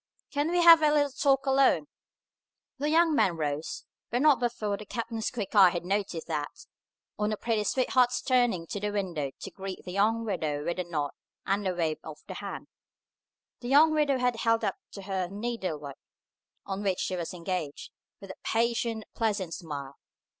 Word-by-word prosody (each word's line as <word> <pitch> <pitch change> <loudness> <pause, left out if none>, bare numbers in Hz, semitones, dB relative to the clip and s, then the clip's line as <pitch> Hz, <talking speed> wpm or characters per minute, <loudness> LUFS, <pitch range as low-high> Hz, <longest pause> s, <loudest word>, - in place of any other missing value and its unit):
Can 290 +2 0
we 350 0 +2
have 335 -1 +9
a 305 -1 +4
little 290 -1 +2
talk 275 0 +2
alone?" 270 +1 +4 0.9
The 295 +2 0
young 325 +1 +4
man 185 - +2
rose; 150 0 -3 0.2
but 245 +4 0
not 295 -5 +6
before 225 -4 -1
the 210 - -8
captain's 225 0 -3
quick 215 -6 -5
eye 195 -4 +8
had 175 0 -4
noticed 195 -3 -2
that, 150 -3 -4 0.5
on 210 0 +1
the 215 - -2
pretty 225 -2 0
sweetheart's 250 +1 +2
turning 245 -10 +2
to 200 - -5
the 210 +1 -2
window 180 -9 -2
to - - -7
greet 195 -1 -7
the 180 - -6
young 220 +4 +1
widow 155 -8 -2
with 170 +1 -2
a 180 - -1
nod 150 -4 -2 0.3
and 195 0 0
a 185 - -1
wave 160 -3 -1
of 155 -1 -8
the - - -7
hand, - - -6 0.9
the 240 - -7
young 310 +3 +6
widow 295 -3 +2
had 250 -2 +1
held 230 0 +2
up 200 -3 -1 0.2
to 200 - -8
her 190 -2 -2
the 195 - -11
needlework 185 - -4 0.7
on 195 0 -4
which 195 -3 0
she 185 - -1
was 170 -2 -4
engaged, 175 -4 -4 0.3
with 195 -1 -9
a - - -10
patient 230 -1 0
and - - -31
pleasant 205 -7 -1
smile. 145 -6 -7
205 Hz, 190 wpm, -28 LUFS, 175-245 Hz, 0.9 s, have